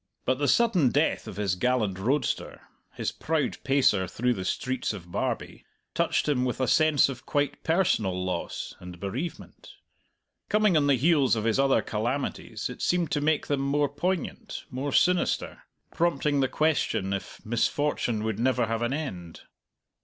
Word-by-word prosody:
But 130 +1 +1
the 145 - +1
sudden 205 - +4
death - - +1
of - - -7
his 100 -3 0
gallant 110 -2 0
roadster, 135 +9 -1 0.3
his - - -2
proud 155 -2 -1
pacer 130 -9 +3
through 125 +7 0
the 95 -5 -5
streets 130 +5 -2
of 90 -4 -10
Barbie, - - -3 0.3
touched - - +1
him 135 -4 +2
with 125 0 -2
a 130 - +1
sense 155 -1 +4
of 130 -2 -8
quite 145 0 -1
personal 110 - +1
loss 90 -2 -4
and 90 -1 -10
bereavement. 125 - -6 0.7
Coming 210 -3 +3
on 145 -2 +3
the 140 - +5
heels 140 -2 +3
of 110 - -2
his 115 +3 +1
other 135 -1 +3
calamities 120 +5 -3
it - - -8
seemed 175 -2 +1
to 145 - 0
make 155 0 +1
them 145 -1 0
more 140 +1 +1
poignant, 175 +4 -3
more 135 +3 -3
sinister, 180 +5 +1 0.3
prompting 160 -4 +1
the 135 - +3
question 145 -11 0
if 100 - -6
misfortune 120 0 0
would 110 -1 -2
never 125 0 +2
have 115 +1 -2
an 120 +2 0
end. 90 - -5
130 Hz, 160 wpm, -27 LUFS, 110-150 Hz, 0.7 s, the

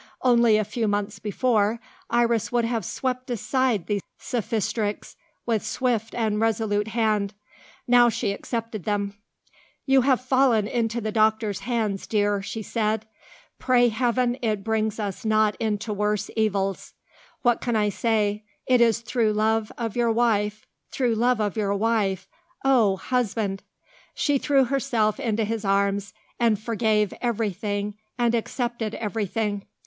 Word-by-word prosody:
Only 235 -3 +5
a 215 - +1
few 220 +2 -2
months 205 +1 -2
before, 215 0 +1 0.3
Iris 235 -1 +1
would 240 -1 +2
have 230 -2 -1
swept 255 +6 -3
aside 240 -2 0
these 205 -2 -1 0.2
sophistrics 220 -2 -2 0.3
with 225 -3 0
swift 225 0 -1
and 220 -3 0
resolute 220 -2 +1
hand. 215 -3 0 0.5
Now 245 0 +6
she 205 - -1
accepted 225 -1 -4
them. 200 -1 -1 0.7
"You 270 -1 +5
have 260 0 +3
fallen 255 -4 +3
into 235 0 -1
the 215 0 -2
doctor's 215 -2 +1
hands, 215 -3 -2
dear," 205 -2 +1
she 210 +3 -5
said. 220 0 -1 0.5
"Pray 245 -1 +4
Heaven 245 +2 0
it 215 -4 -1
brings 220 0 -1
us 200 -3 -4
not 215 -1 +2
into 215 0 -2
worse 210 0 -1
evils! 195 -3 -1 0.5
What 240 -2 +3
can 240 -2 -1
I 210 -1 +2
say? 210 0 0 0.2
it 250 -1 +4
is 230 -1 +3
through 230 -2 0
love 220 +1 +1
of 230 -3 -3
your 240 -1 +2
wife 215 -2 +1 0.2
through 245 -3 0
love 240 +1 +2
of 210 -2 -1
your 200 -2 0
wife 200 -3 0 0.4
oh! 235 -8 +4
husband!" 215 -5 -1 0.5
she 285 -2 +1
threw 275 -1 +3
herself 245 -4 0
into 225 -4 0
his 225 0 -3
arms, 200 0 +1 0.3
and 230 -3 +3
forgave 215 -2 +1
everything 210 -3 -2 0.2
and 240 -1 +2
accepted 235 -1 -2
everything. 210 -1 -2
220 Hz, 140 wpm, -25 LUFS, 210-235 Hz, 0.7 s, Now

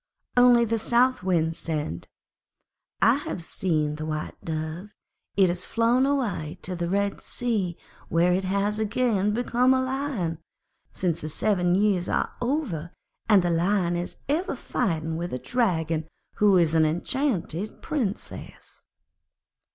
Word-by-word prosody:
Only 245 -1 +6
the 230 0 0
South 245 +3 +2
Wind 165 -3 +1
said, 150 - -4 1.0
'I - - +6
have 170 - -5
seen 155 -4 -1
the 155 - -4
White 155 -1 -3
Dove. 160 +5 -5 0.4
It 195 -2 +6
has 180 +1 0
flown 235 +3 +2
away 220 - -1
to 185 - -4
the 170 -1 -2
Red 200 +1 0
Sea, 210 -8 -2 0.3
where 170 +2 +3
it 190 +2 0
has 200 +3 0
again 215 -2 +1
become 245 +3 +2
a - - +2
Lion, 260 - -2 0.5
since 175 -4 -1
the 155 - -4
seven 180 +1 +1
years 195 -3 +2
are - - 0
over; 240 - -2 0.4
and 200 -4 +6
the 175 - +1
Lion 175 +1 +1
is 175 +1 -3
ever 325 +7 0
fighting 160 -2 -2
with 175 -2 -4
a - - -1
Dragon 165 - 0 0.3
who 205 -2 +5
is 165 -3 +3
an 160 -1 +4
enchanted 185 - -2
Princess.' 235 -10 -5
190 Hz, 140 wpm, -26 LUFS, 165-235 Hz, 1.0 s, Only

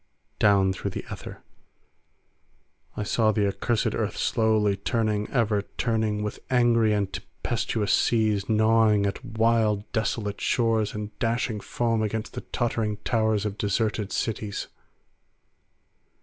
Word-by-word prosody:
Down 100 -2 +4
through 100 - -4
the - - -6
aether - - -8 1.5
I 105 - -1
saw 110 +1 +2
the 105 -1 +1
accursed 110 +3 0
earth - - -2
slowly 110 -2 +2
turning, 105 +1 -1
ever 110 -5 +1 0.2
turning, 110 -3 0
with 105 - -4
angry 120 -3 +3
and 100 -2 0
tempestuous 110 -3 -2
seas 110 -3 +2
gnawing 110 -1 +4
at 100 - -3
wild 110 -2 +1
desolate 105 -2 -2
shores 115 -3 +1
and 105 0 -5
dashing 115 -1 0
foam 115 +1 -1
against 110 +1 -3
the - - -5
tottering 115 -3 -2
towers 110 -2 +1
of 105 0 -4
deserted 105 0 -1
cities. 105 -2 -3
110 Hz, 120 wpm, -26 LUFS, 105-115 Hz, 1.5 s, Down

